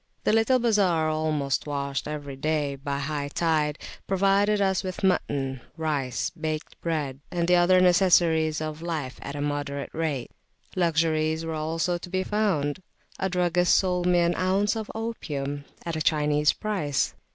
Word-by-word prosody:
The - - +2
little 225 +4 +4
bazar, 195 -9 +2
almost 155 -4 -1
washed 140 -1 -2
by 150 - -4
every 145 -2 -6
high 145 -1 -1
tide, 155 -3 +1 0.3
provided 200 +2 +3
us 190 -2 +2
with 185 0 -5
mutton, 135 -8 0 0.2
rice, 145 -5 -1
baked 155 -2 -5
bread, 150 -5 -2
and 170 -1 -1
the 180 0 +5
other 180 +1 +5
necessaries 170 -4 +4
of 155 0 -4
life 155 -7 -4
at 140 - -6
a 145 - -3
moderate 145 -1 -3
rate. 150 -6 -2 0.4
Luxuries 160 -2 +1
also 160 +2 -1
were 175 - -2
to 175 - -9
be 185 +1 0
found: 185 -8 0 0.4
a 190 - 0
druggist 180 -1 +2
sold 180 -2 +1
me 175 -1 +4
an 170 0 +2
ounce 195 +3 +1
of 220 -1 -4
opium 145 -11 -4 0.2
at 170 -1 -2
a 155 - -2
Chinese 150 -1 +3
price. 185 -10 -1
160 Hz, 150 wpm, -26 LUFS, 145-185 Hz, 0.4 s, the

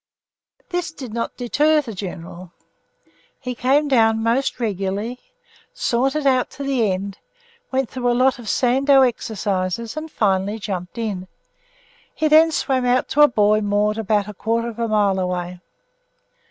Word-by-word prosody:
This 355 -2 -2
did 260 -8 -9
not 230 0 -4
deter 300 +5 +2
the 255 -7 -5
General. 180 -2 -8 0.9
He 250 -2 -4
came 270 +5 +2
down 225 -4 +3
most 240 +5 0
regularly, 205 +2 -3 0.6
sauntered 270 +5 0
out 260 -2 +2
to 280 - -5
the 255 -7 +1
end, 195 +1 -4 0.5
went 265 -1 0
through 245 -1 -1
a 240 - +1
lot 260 +1 +3
of 230 - -7
Sandow 270 +2 +4
exercises 210 -3 -2
and 310 +1 -5
finally 200 -3 0
jumped 195 -1 -5
in. 200 -5 -3 0.9
He 315 - +1
then 315 +2 +6
swam 265 -4 0
out 250 +1 +1
to 295 - +2
a 295 - +9
buoy 215 -3 +2
moored 210 +1 0
about 210 -1 0
a 210 - -7
quarter 230 +3 -1
of 235 0 -10
a 230 - 0
mile 205 -3 +2
away. 180 -1 -3
230 Hz, 155 wpm, -21 LUFS, 205-265 Hz, 0.9 s, a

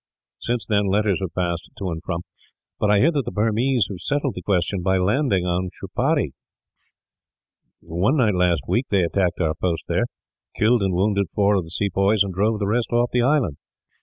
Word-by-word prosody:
"Since 120 -1 -2
then 105 -2 +1
letters 100 -1 +1
have 95 -3 -4
passed 85 -2 -2
to 95 -3 -3
and 80 0 -5
fro, 85 -1 -3 0.6
but 105 - +1
I 105 - +5
hear 140 +11 +4
that 145 -4 0
the - - -5
Burmese 115 +2 +1
have 95 -3 -6
settled 145 +2 -1
the - - -7
question 95 -1 0
by 95 +1 +2
landing 100 0 +1
on 90 +1 -1
Shapuree. - - 0 1.5
One 95 - 0
night 110 -6 +3
last 90 -3 +2
week 125 +3 0
they 100 -3 +2
attacked 90 +1 0
our 80 -3 +1
post 85 0 -2
there, - - +1 0.5
killed 115 +2 +3
and 95 -2 0
wounded 100 +1 +1
four 100 0 +3
of 95 -4 0
the - - -12
sepoys, 100 +3 +1
and 95 -2 -5
drove 105 +4 +1
the 105 - -2
rest 115 +4 0
off 120 0 +2
the 125 - +3
island. 125 - +1
100 Hz, 195 wpm, -22 LUFS, 90-115 Hz, 1.5 s, I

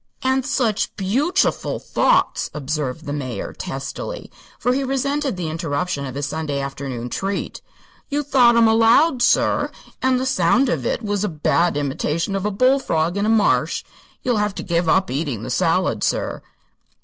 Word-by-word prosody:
"An' 260 +1 +2
such 245 -5 0
_beaut_chiful 260 - 0
thoughts," - - +1
observed 150 0 -3
the 145 - -3
Major, 130 -5 -4
testily, 135 - -6 0.3
for 250 - +1
he 275 +2 0
resented 275 -2 -1
the 175 -3 -3
interruption 155 -2 -2
of 130 - -7
his 145 0 -2
Sunday 145 -1 -3
afternoon 135 -3 -5
treat. 195 +10 -3 0.5
"You 295 +1 -1
thought 255 -4 +4
'em 230 -1 +5
aloud, 235 +6 +4
sir, 245 - +3 0.3
and 255 -1 +2
the 260 - -1
sound 250 +2 +3
of - - -1
it - - -2
was 205 -1 -1
a 210 - 0
bad 170 +2 +1
imithation 150 +6 -1
of 195 +1 -1
a - - +1
bullfrog 195 -8 +2
in 200 +1 0
a - - +2
marsh. 220 -2 +2 0.4
You'll 245 -3 +1
have 210 -1 0
to - - -5
give 170 -2 0
up 190 -2 +2
eating 140 -5 -2
the - - -5
salad, - - +1
sir." - - -1
195 Hz, 165 wpm, -21 LUFS, 150-255 Hz, 0.5 s, em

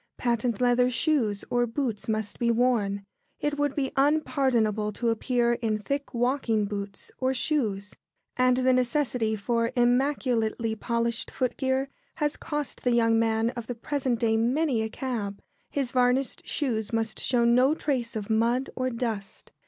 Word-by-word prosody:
Patent 235 -2 0
leather 250 0 +3
shoes 245 -7 0
or 240 0 +2
boots 230 -3 -3
must 215 -1 -2
be 235 - +2
worn. 225 -5 +1 0.3
It 295 0 -2
would 290 -1 0
be 270 -3 -1
unpardonable 265 -7 +2
to 235 +3 -1
appear 240 +1 +1
in 225 -3 -1
thick 280 +7 -3
walking 240 -3 +1
boots 200 -1 -6
or 260 0 +1
shoes; 215 -9 -1 0.4
and 255 0 +3
the 255 0 +3
necessity 250 -3 +1
for 230 +3 0
immaculately 245 -3 +1
polished 235 +1 -1
footgear 260 +2 -1 0.3
has 295 0 -1
cost 295 -3 -5
the 245 - +2
young 230 -1 +3
man 225 0 +1
of 235 -3 -7
the 245 - -4
present 260 -1 -1
day 225 -1 +2
many 250 +2 +1
a 220 - -2
cab. 220 -5 -4 0.3
His 270 -4 -1
varnished 250 +1 +1
shoes 225 -7 -1
must 225 -1 -1
show 240 -2 +2
no 250 +5 +4
trace 250 -8 -2
of 210 -2 -3
mud 235 +4 +1
or 255 0 0
dust. 230 -5 -5
240 Hz, 155 wpm, -27 LUFS, 225-260 Hz, 0.4 s, no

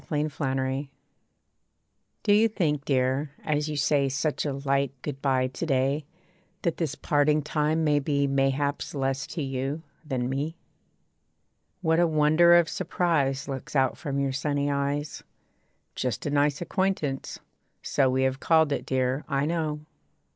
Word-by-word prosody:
A - - -23
MAN'S 150 0 -1
GOOD 135 -3 -1
BYE 135 +1 -2 1.3
Do 205 - +4
you 215 +2 +5
think, 155 -10 -1
dear, 135 +2 0
as 150 0 0
you 150 - -3
say 140 -1 +2
Such 150 +3 -1
a 140 - -1
light 140 -1 -1
good 140 -2 -5
bye 130 -2 +2
to 130 +6 -4
day, 135 +1 +1 0.6
That 170 -3 0
this 160 -5 -2
parting 150 0 +2
time 155 +2 0
may 150 -2 +3
be 140 0 +1
Mayhaps 140 +2 0
less 135 -1 -1
to 160 - -4
you, 135 +3 -3 0.2
than 130 -5 -2
me? 145 +5 -3 1.3
What 160 0 +3
a 175 - +4
wonder 155 +2 +5
of 170 -1 +5
surprise 155 -8 0
Looks 135 +1 -6
out 130 -1 +3
from 140 -4 -3
your 135 -1 0
sunny 145 0 0
eyes. 140 +1 -2 0.7
'Just 125 -6 -3
a 145 - -1
nice 145 +1 +2
acquaintance.' 175 -7 -2 0.4
So 135 -2 +2
We 130 +1 +1
have 130 0 0
called 160 -1 +3
it, - - -2
dear, 130 +2 0
I 140 -1 +1
know. 155 -2 -1
145 Hz, 155 wpm, -27 LUFS, 135-155 Hz, 1.3 s, you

